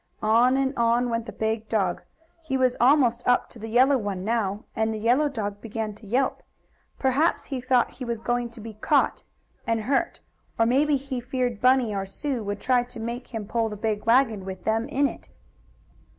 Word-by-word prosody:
On 235 +4 +4
and 270 0 0
on 235 +1 +2
went 230 0 -2
the - - -5
big 220 0 -2
dog. 195 -5 0 0.4
He 280 -5 -2
was 255 -1 +2
almost 245 -2 +4
up 245 0 +3
to 235 - -13
the 220 - -6
yellow 260 +4 +4
one 195 -3 -4
now, 210 -3 -1
and 220 0 0
the 220 - -3
yellow 245 +7 +2
dog 205 -6 -4
began 220 -1 -4
to 210 +1 -15
yelp. 255 +5 0 0.6
Perhaps 275 +5 +1
he 265 -3 -4
thought 250 -1 +2
he 260 - -9
was 235 -2 -3
going 240 +1 -1
to 230 0 -14
be 220 0 -8
caught 215 - +1 0.4
and 230 -1 +1
hurt. 275 +8 0 0.4
Or 225 - +4
maybe 285 +5 +3
he 265 -1 -5
feared 245 -2 -2
Bunny 255 -3 +4
or 195 -1 -3
Sue 255 +4 -3
would 205 0 -4
try 250 +1 +2
to 245 -1 -10
make 235 +2 -5
him 225 -4 -5
pull 225 +1 -1
the 210 - -6
big 210 0 -2
wagon, 230 -4 +3
with 190 -1 -7
them 225 +2 0
in 285 0 +1
it. 240 - -10
235 Hz, 200 wpm, -25 LUFS, 220-255 Hz, 0.6 s, On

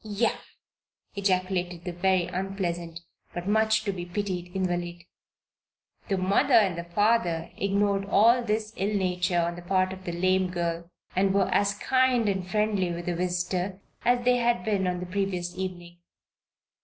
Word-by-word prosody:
"Yah!" 215 +2 0 0.8
ejaculated 185 -3 -1
the 180 - -4
very 185 0 +2
unpleasant, 175 -3 -4 0.3
but 175 +1 -4
much 220 +1 +3
to 205 - -1
be 180 -2 -5
pitied 180 -1 -3
invalid. 175 -2 -2 1.0
The 195 - 0
mother 200 +9 +3
and 185 -6 +3
father 180 -5 +1
ignored 200 0 +1
all 230 +5 +4
this 215 -1 -2
ill 200 +2 0
nature 180 -1 0
on 170 +1 -1
the 175 - -8
part 185 +1 +1
of 190 0 -11
the 175 - -2
lame 185 +2 +1
girl 170 -1 -3 0.3
and 190 +1 +3
were 195 -2 +3
as 200 0 +2
kind 255 -1 +2
and 190 -2 -1
friendly 210 -3 +1
with 170 0 -5
their 175 - -1
visitor 180 +2 -2 0.2
as 245 0 +2
they 250 0 +4
had 235 -6 +1
been 200 -3 +1
on 180 0 -2
the - - -4
previous 180 -2 -2
evening. 175 -2 -6
185 Hz, 155 wpm, -27 LUFS, 175-205 Hz, 1.0 s, all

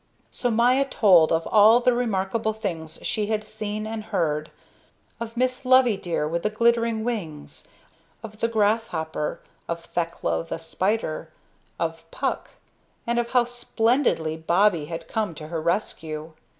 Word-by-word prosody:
So 245 - -1
Maya 245 +4 +4
told 185 -11 +5
of 165 0 +1
all 220 +2 +7
the 250 0 +3
remarkable 220 -2 0
things 160 -7 -5
she 210 -1 -1
had 215 -1 -1
seen 215 0 -5
and 215 -1 -5
heard, 155 -6 -1 0.7
of 230 0 -6
Miss 255 +1 0
Loveydear 230 -12 +3
with 170 +2 -2
the 210 - 0
glittering 230 0 +2
wings, 180 -11 -5 0.6
of 215 -1 -9
the 230 - +2
grasshopper, 205 -9 -1 0.3
of 170 0 -4
Thekla 165 - -2
the 80 - -4
spider, 165 +1 -2 0.5
of - - -3
Puck, - - -3 0.5
and 235 0 +1
of 235 0 -1
how 245 -1 +5
splendidly 240 - 0
Bobbie 170 +1 +2
had 165 +1 -6
come 210 -7 -2
to 155 0 -8
her 165 -1 -3
rescue. 160 -3 -2
210 Hz, 140 wpm, -24 LUFS, 165-230 Hz, 0.7 s, all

